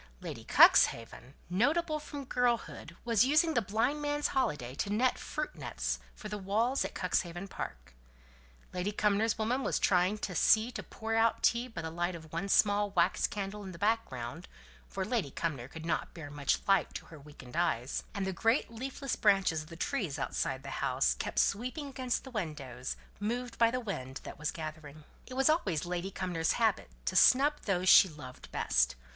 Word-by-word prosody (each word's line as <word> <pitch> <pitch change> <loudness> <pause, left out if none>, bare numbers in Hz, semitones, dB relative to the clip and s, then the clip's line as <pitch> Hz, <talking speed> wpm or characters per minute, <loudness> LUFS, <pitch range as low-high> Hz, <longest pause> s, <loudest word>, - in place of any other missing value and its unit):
Lady - - -7
Cuxhaven, 120 +4 +4
notable 305 - +1
from 290 -2 -7
girlhood, 240 -9 -1
was 230 -2 +4
using 310 +5 +3
the 240 - +2
blind 225 +9 0
man's 290 0 0
holiday 145 - -1
to 170 - -3
net 240 +5 +1
fruit 305 0 -4
nets - - -3 0.2
for 215 - -8
the 210 0 -5
walls 220 +7 +1
at - - -6
Cuxhaven 175 0 -1
Park. 180 - -7 0.8
Lady 180 +3 -1
Cumnor's 210 +1 +1
woman 235 +4 0
was - - 0
trying 185 +2 +2
to 200 -3 -4
see 220 +7 +4
to - - -5
pour 225 0 -5
out 225 0 +2
tea 235 +1 +3
by 225 -8 -7
the 160 - -4
light 175 +2 -2
of 160 -1 -12
one 195 +4 -2
small 205 0 +4
wax 180 -2 +2
candle 205 0 -5
in 190 -1 -7
the - - -10
background 170 - -2 0.4
(for 190 -1 -3
Lady 215 - -1
Cumnor 135 -4 -3
could 160 +3 -9
not 165 - -2
bear 155 -4 -8
much 145 -1 0
light 195 -4 +2
to - - -6
her 155 - -12
weakened 140 -3 -13
eyes); 155 -7 0
and 200 -1 -1
the 190 - -2
great 225 - +1
leafless 265 +3 -4
branches 195 -6 +3
of 155 - -12
the 165 - -9
trees 185 - -2
outside 135 -1 -2
the 140 - -7
house - - +2
kept - - -5
sweeping 255 +8 0
against 255 -2 -2
the 265 - -10
windows, 140 - -4 0.2
moved 235 +3 -3
by 230 -1 +6
the 250 +2 -1
wind 135 - -5
that - - -9
was 150 +1 -1
gathering. 155 -1 -7 0.2
It 255 - -8
was 270 0 +3
always 195 - +1
Lady 180 +2 -3
Cumnor's 180 -4 -1
habit 225 -3 +1 0.2
to 185 - -1
snub 275 +9 +6
those 185 -2 0
she 190 - +8
loved 130 -5 -11
best. - - +2
195 Hz, 185 wpm, -31 LUFS, 160-235 Hz, 0.8 s, she